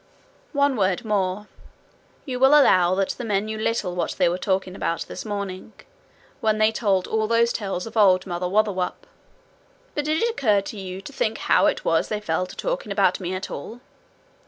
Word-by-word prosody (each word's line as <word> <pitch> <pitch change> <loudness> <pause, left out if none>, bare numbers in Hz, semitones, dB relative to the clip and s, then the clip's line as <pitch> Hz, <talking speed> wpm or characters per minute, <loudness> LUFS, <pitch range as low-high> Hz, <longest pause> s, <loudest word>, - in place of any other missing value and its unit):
One 280 -2 +2
word 190 +3 0
more: 200 -1 -1 0.8
you 255 -4 -4
will 270 +3 +7
allow 185 -9 +4
that 195 0 0
the 245 - -4
men 205 -2 0
knew 220 0 -5
little 220 -5 -1
what 175 - -2
they - - +3
were 175 +2 -1
talking 190 -1 -1
about 165 -3 -2
this - - -6
morning, 200 -1 -5 0.7
when 215 -1 +1
they 215 0 +4
told 200 -5 +1
all 220 -1 0
those 230 +1 +2
tales 195 -4 -3
of 225 0 -10
Old 185 -4 +4
Mother 180 -1 -3
Wotherwop; 200 -2 0 0.9
but 295 - -2
did 310 +6 +1
it - - +3
occur 215 - +2
to 200 +1 -8
you 190 0 -6
to - - -10
think - - -1
how - - +3
it - - -1
was - - +2
they 215 - -2
fell 180 -2 -1
to - - -11
talking - - -3
about - - +2
me 185 0 -3
at 185 - -5
all? 220 +12 -7
205 Hz, 195 wpm, -23 LUFS, 185-230 Hz, 0.9 s, will